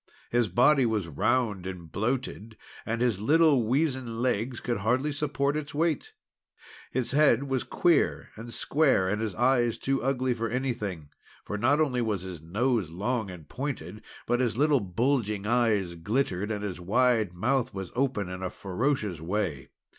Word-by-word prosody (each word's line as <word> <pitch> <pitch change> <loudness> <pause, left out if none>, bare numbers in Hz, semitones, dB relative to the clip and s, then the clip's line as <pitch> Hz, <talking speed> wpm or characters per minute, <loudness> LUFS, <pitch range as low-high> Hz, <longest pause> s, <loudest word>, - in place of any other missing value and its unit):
His 120 -1 +2
body 130 - +4
was 110 -6 0
round 105 - 0
and 90 -4 -8
bloated, 115 0 -3 0.3
and 115 +1 -1
his 115 -6 +1
little 150 +2 +4
weazen 130 -2 0
legs 120 0 0
could 120 -1 -2
hardly 125 +9 +1
support 145 -1 -1
its 150 -1 -4
weight. 170 - 0 0.8
His 130 -2 -1
head 140 -3 +4
was 135 -2 -1
queer 170 -3 +1
and 115 +2 -9
square, 135 -9 +2
and 105 +3 -1
his 110 -4 -3
face 120 -1 +2
too 135 0 -1
ugly 130 -1 0
for 115 -1 -3
anything, 105 - -3 0.4
for - - -4
not 130 +8 +2
only 130 -6 +1
was 105 -5 -1
his 90 -4 -7
nose 105 +3 0
long 105 +5 -2
and 90 -5 -10
pointed, 125 -7 -5 0.2
but 120 - +1
his 120 -3 0
little 145 0 +4
bulging 105 +1 0
eyes 110 -6 +2
glittered, 100 +2 -1
and 105 -2 -3
his 95 -3 -4
wide 110 -1 +2
mouth 125 +7 0
was 95 -2 -6
opened 125 -8 0
in 90 0 -6
a 95 - -2
ferocious 105 - -2
way. 85 -5 -2
115 Hz, 160 wpm, -28 LUFS, 100-130 Hz, 0.8 s, body